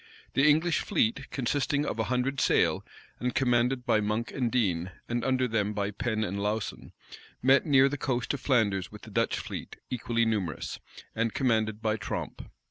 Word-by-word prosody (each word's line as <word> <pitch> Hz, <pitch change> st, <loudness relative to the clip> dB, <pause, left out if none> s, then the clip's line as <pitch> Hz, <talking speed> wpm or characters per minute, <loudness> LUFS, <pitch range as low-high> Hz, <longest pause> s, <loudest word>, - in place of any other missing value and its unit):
The 140 Hz, +2 st, +5 dB
English 160 Hz, +3 st, +3 dB
fleet, 140 Hz, -, 0 dB
consisting 145 Hz, +2 st, 0 dB
of 115 Hz, -, -3 dB
a 110 Hz, -, +1 dB
hundred 130 Hz, +2 st, 0 dB
sail, -, -, +3 dB, 0.4 s
and 125 Hz, 0 st, -2 dB
commanded 125 Hz, 0 st, +2 dB
by 110 Hz, -, +3 dB
Monk 105 Hz, +3 st, -1 dB
and 125 Hz, -4 st, -1 dB
Dean, 95 Hz, -8 st, +1 dB, 0.2 s
and 120 Hz, 0 st, -1 dB
under 130 Hz, 0 st, +2 dB
them 105 Hz, -3 st, 0 dB
by 100 Hz, 0 st, -1 dB
Pen 110 Hz, +1 st, -1 dB
and 100 Hz, 0 st, -3 dB
Lauson, 105 Hz, +1 st, -3 dB, 0.5 s
met 135 Hz, +4 st, +5 dB
near 135 Hz, -2 st, +6 dB
the 145 Hz, 0 st, -3 dB
coast 125 Hz, -2 st, -1 dB
of 140 Hz, -, -3 dB
Flanders 105 Hz, -8 st, +1 dB
with -, -, -12 dB
the -, -, -11 dB
Dutch -, -, +1 dB
fleet -, -, -6 dB, 0.2 s
equally 115 Hz, -1 st, 0 dB
numerous, 100 Hz, -8 st, -2 dB, 0.3 s
and 115 Hz, 0 st, -1 dB
commanded 110 Hz, -3 st, +1 dB
by 110 Hz, 0 st, +1 dB
Tromp. 105 Hz, -, -5 dB
120 Hz, 175 wpm, -29 LUFS, 110-135 Hz, 0.5 s, near